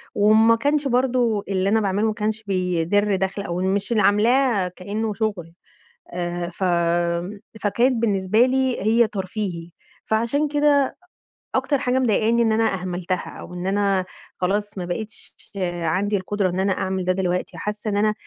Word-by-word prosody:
وإن 210 +1 +4
ما 225 +1 +6
كانش 285 +4 0
برضه 245 -4 +1
اللي 190 0 +1
أنا 220 +2 +3
باعمله 200 +2 +1
ما 215 - 0
كانش 215 +1 -2
بيدرّ 190 +1 +1
دخل، 190 +1 -2
أو 175 -2 -3
مش 195 +4 -1
اللي 215 -2 +3
عاملاه 225 -1 +3
كإنه 205 +4 -4
شغل، 195 -6 -3 0.6
آآ، 175 0 -3
ف 185 +2 -4 1.0
فكانت 240 +5 +2
بالنسبة 210 +2 +3
لي 260 -1 0
هي 225 +2 +4
ترفيهي، 185 -4 -4 0.3
فعشان 235 +7 0
كده 290 -1 +3 0.5
أ - - -5
أكتر 285 -3 0
حاجة 255 -1 +1
مضايقاني 230 -1 +2
إن 225 -1 +3
أنا 220 -1 +2
أهملتها 180 -1 -3
أو - - -10
إن 180 +1 -4
أنا 195 -1 +1 0.3
خلاص 205 +3 -1
ما 180 - -3
بقِتش 210 +5 -6 0.5
عندي 195 +6 +1
القدرة 195 0 -1
إن 180 +1 -3
أنا 190 0 +2
أعمل 190 -1 -2
ده 185 - +2
دلوقتي، 180 -1 -2
حاسة 210 +1 -4
إن 205 - -1
أنا 215 +1 +2
205 Hz, 160 wpm, -22 LUFS, 185-225 Hz, 1.0 s, ما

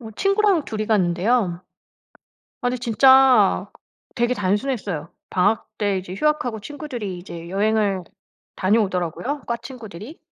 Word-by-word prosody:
어 225 -2 -9
친구랑 395 -4 +2
2 215 -1 -5
이 215 - -1
갔는데요. 185 -1 +1 1.0
아니 245 0 -1
진짜 260 +3 +5 0.5
되게 240 0 +1
단순했어요. 205 - -2 0.2
방학 190 +4 +1
때 205 -2 +1
이제 185 0 -7
휴학하고 250 -3 0
친구들이 240 - -6
이제 170 -2 -9
여행을 205 -2 +1 0.5
다녀오더라고요 200 - 0
과 235 - -1
친구들이. 235 - -10
220 Hz, 290 characters per minute, -22 LUFS, 190-255 Hz, 1.0 s, 진짜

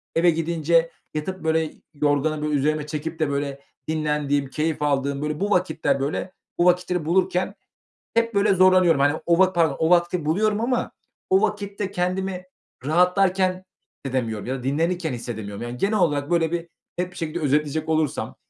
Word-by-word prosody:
Eve 170 +1 +5
gidince 165 0 +1 0.2
yatıp, 185 +5 -4
böyle, 160 -1 0 0.2
yorganı, 150 +1 0
böyle, 150 0 -1
üzerime, 150 +2 +1
böyle, 150 0 -6
çekip 155 +2 -5
de, 155 -3 +1
böyle, 140 -1 -3 0.3
dinlendiğim, 150 -3 0
keyif 155 +1 -2
aldığım, 140 -1 0
böyle, 150 +1 -2
bu 205 +1 -1
vakitler, 160 -6 +1
böyle, 145 +6 -2 0.3
bu 175 - +4
vakitleri 180 -2 +2
bulurken 180 +2 +1 0.6
hep, 230 0 +1
böyle, 200 0 +4
zorlanıyorum. 185 -4 +5
Hani, 145 +2 +2
o 170 0 +3
va 190 0 +4
pardon 165 -5 +2
o 160 - +2
vakti 175 -2 +2
buluyorum 210 +7 +1
ama 250 +1 0 0.4
o 380 0 +4
vakitte 200 -1 -2
kendimi 185 0 -2 0.4
rahatlarken 185 +2 +2 0.4
hissedemiyorum 115 -5 -2
ya 130 - -2
da - - -11
dinlenirken 160 +3 0
hissedemiyorum. 110 -4 -6
Yani, 120 +1 -6
genel 205 - +1
olarak, 150 -3 +1
böyle, 165 -1 +2
bir 170 0 -3 0.3
net 180 0 -1
bir 180 - -14
şekilde 165 0 -3
özetleyecek 150 +1 0
olursam; 155 -2 -1
160 Hz, 165 wpm, -23 LUFS, 145-180 Hz, 0.6 s, Eve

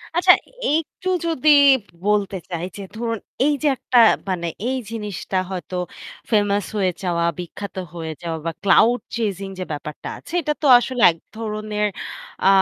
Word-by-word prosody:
আচ্ছা, 360 +1 +7 0.4
একটু 325 +3 -3 0.2
যদি 310 -2 +1 0.6
বলতে 205 -2 +1
চাই 170 -1 -3
যে 200 - -6
ধরুন 230 -1 -2 0.3
এইযে 295 0 +1
একটা 250 - 0 0.3
মানে 175 -2 -1 0.2
এই 260 - 0
জিনিসটা 210 -4 -4
হয়তো 185 -1 -5 0.6
ফেমাস 205 -2 +2
হয়ে 190 -3 +2
যাওয়া, 170 -2 0
বিখ্যাত 185 +3 -7 0.2
হয়ে 160 -2 -5
যাওয়া 165 -1 -3
বা 165 - 0
ক্লাউড 230 +5 +5 0.2
চেজিং 200 -4 -2
যে 185 - -1
ব্যাপারটা 150 0 -6
আছে - - -13
এটা 300 -1 0
তো 295 - +2
আসলে 250 0 -3
এক 165 - -12 0.2
ধরনের 215 -1 -2 0.6
আ - - +4
205 Hz, 145 wpm, -21 LUFS, 180-245 Hz, 0.6 s, আচ্ছা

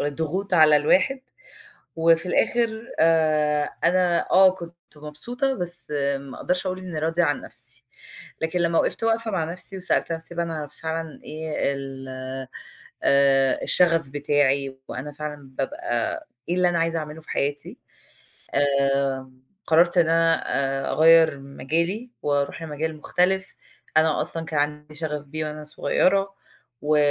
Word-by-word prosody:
الضغوط 160 +7 -2
على 155 -3 +7
الواحد 190 - +2 0.8
وفي 165 +1 +3
الآخر 230 +4 0
آآ، 155 -2 +3
أنا 175 0 +2
آه، 190 +1 +7
كنت 170 -2 -9 0.2
مبسوطة، 240 - -3
بس 175 -4 -5 0.3
ما 135 -1 -10
أقدرش 180 +1 -1
أقول 185 0 -2
إني 180 -4 -5
راضية 165 +3 +1
عن 145 -3 0
نفسي. 130 +1 -10 0.6
لكن 160 +2 -1
لمّا 170 -1 +2
وقفت - - -1
واقفة 225 0 +1
مع 180 -4 0
نفسي 180 +3 -7
وسألت 180 -2 0
نفسي 165 +1 -6
بقى: 170 0 0
"إن 165 - -5
أنا 150 -2 -4
فعلًا 160 +1 -5
إيه 155 -2 -2
ال 135 -1 -7 1.0
آآ، 135 -1 +4
الشغف 165 -4 +3
بتاعي؟ 140 -1 +1
وأنا 140 +4 -6
فعلًا 145 -2 -7
بابقى 120 -3 -2 0.2
إيه 175 - +1
اللي 180 0 +3
أنا 175 -1 0
عايزة 165 0 0
أعمله 155 +1 -6
في 155 - -14
حياتي؟" 145 +1 -3 0.8
آآ، 140 -2 +1 0.4
قرَّرت 170 +3 +4
إن 165 -2 +4
أنا 165 0 +3 0.4
آآ، - - -1
أغيِّر 160 -1 +5
مجالي 165 - -2
وأروح 145 +2 -1
لمجال 155 0 -4
مختلف، 190 +5 0 0.4
أنا 160 -1 +3
أصلًا 165 0 -3
كان 155 -2 -1
عندي 150 +1 -3
شغف 150 -2 -3
بيه 155 +2 -4
وأنا 150 0 -7
صغيرة، 195 +6 +1 0.5
و 150 +1 +2
160 Hz, 140 wpm, -24 LUFS, 145-175 Hz, 1.0 s, على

